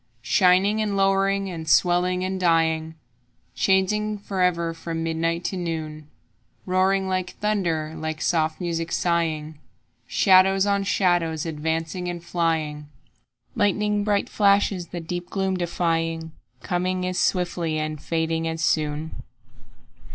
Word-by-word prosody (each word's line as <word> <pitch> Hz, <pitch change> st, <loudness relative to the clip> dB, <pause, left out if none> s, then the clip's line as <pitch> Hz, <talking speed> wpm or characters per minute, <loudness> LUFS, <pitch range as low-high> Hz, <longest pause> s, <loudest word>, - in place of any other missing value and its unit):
Shining 195 Hz, +3 st, +3 dB
and 205 Hz, -2 st, -1 dB
lowering 195 Hz, 0 st, +2 dB
and 165 Hz, -4 st, -6 dB
swelling 180 Hz, +1 st, +3 dB
and 190 Hz, 0 st, -2 dB
dying, 160 Hz, -2 st, +1 dB, 0.6 s
Changing 210 Hz, +2 st, +1 dB
forever 180 Hz, -4 st, 0 dB
from 165 Hz, 0 st, -5 dB
midnight 165 Hz, +1 st, -1 dB
to 190 Hz, -, -2 dB
noon; 155 Hz, -3 st, -5 dB, 0.6 s
Roaring 190 Hz, +1 st, +2 dB
like 185 Hz, -1 st, -2 dB
thunder, 170 Hz, -7 st, -1 dB
like 160 Hz, 0 st, -4 dB
soft 160 Hz, -2 st, 0 dB
music 165 Hz, -2 st, -3 dB
sighing, 160 Hz, -3 st, -1 dB, 0.5 s
Shadows 190 Hz, 0 st, +4 dB
on 200 Hz, -1 st, +1 dB
shadows 175 Hz, -5 st, +1 dB
advancing 160 Hz, +3 st, -3 dB
and 175 Hz, -1 st, -5 dB
flying, 160 Hz, -4 st, -1 dB, 0.7 s
Lighning 210 Hz, -1 st, +1 dB
bright 205 Hz, -1 st, +1 dB
flashes 200 Hz, -3 st, +2 dB
the 175 Hz, -, -6 dB
deep 175 Hz, +2 st, -5 dB
gloom 190 Hz, -1 st, -1 dB
defying, 165 Hz, -2 st, -1 dB, 0.3 s
Coming 180 Hz, +1 st, -1 dB
as 185 Hz, 0 st, -1 dB
swiftly 175 Hz, -3 st, 0 dB
and 155 Hz, -1 st, -3 dB
fading 165 Hz, 0 st, -1 dB
as 160 Hz, 0 st, -3 dB
soon. 155 Hz, 0 st, -1 dB
175 Hz, 120 wpm, -24 LUFS, 160-190 Hz, 0.7 s, Shadows